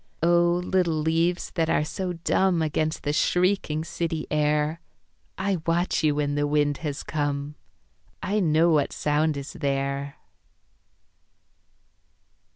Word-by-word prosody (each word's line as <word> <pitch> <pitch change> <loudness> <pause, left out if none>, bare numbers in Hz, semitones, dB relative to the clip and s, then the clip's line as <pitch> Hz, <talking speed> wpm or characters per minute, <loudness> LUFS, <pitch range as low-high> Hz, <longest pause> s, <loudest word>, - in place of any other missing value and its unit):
Oh, 175 0 +4
little 180 -4 +1
leaves 165 +3 0
that 165 -2 0
are 150 - +2
so 180 +3 -3
dumb 175 0 +1
Against 155 +1 -1
the 145 - -1
shrieking 180 -2 +1
city 165 -1 -3
air, 150 +2 +1 0.6
I 190 0 0
watch 170 0 +1
you 150 -2 +3
when 145 -1 0
the 145 0 0
wind 145 -1 +1
has 150 -4 -4
come, 145 -1 -2 0.7
I 205 +3 -1
know 165 -2 +3
what 150 -3 +2
sound 150 0 +1
is 140 0 -6
there. 140 -2 -2
155 Hz, 125 wpm, -25 LUFS, 145-170 Hz, 0.7 s, Oh